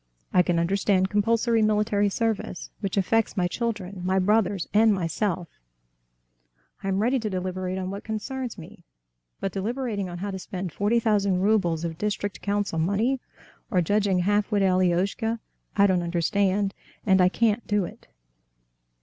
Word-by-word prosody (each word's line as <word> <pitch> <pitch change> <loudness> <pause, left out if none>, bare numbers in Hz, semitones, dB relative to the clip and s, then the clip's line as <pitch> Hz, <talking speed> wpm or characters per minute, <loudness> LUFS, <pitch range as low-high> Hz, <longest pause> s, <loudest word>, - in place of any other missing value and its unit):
I 180 - +6
can 175 -1 +1
understand 190 +2 +2
compulsory 225 +2 +2
military 210 -1 +2
service, 220 -3 -2
which 195 -1 -3
affects 220 +3 +1
my 180 -1 +2
children, 200 -3 -3
my 185 +1 +1
brothers, 200 -1 +2
and 220 +1 +5
myself, 180 0 -1 1.3
I - - -5
am 195 +2 +1
ready 255 +3 +2
to 220 -2 -3
deliberate 185 0 -3
on 185 0 -3
what 200 +1 -6
concerns 240 +2 -4
me; 175 +2 -12 0.6
but 195 - -2
deliberating 210 -1 -2
on 175 - -6
how 200 +3 -4
to 190 - -5
spend 185 -1 -5
forty 210 +4 +2
thousand 200 -5 +2
roubles 180 -6 +2
of 165 0 -5
district 205 0 -2
council 200 -4 -1
money, 210 +10 +1 0.5
or 190 -6 +2
judging 200 +2 +2
the 180 - +1
half 205 +3 +1
witted 200 -2 +3
Alioshka—I 195 +4 0
don't 185 -3 +3
understand, 195 +3 +1 0.3
and 190 -2 +5
I 180 - +5
can't 225 +2 +1
do 205 -3 +1
it." - - -12
200 Hz, 155 wpm, -25 LUFS, 185-215 Hz, 1.3 s, I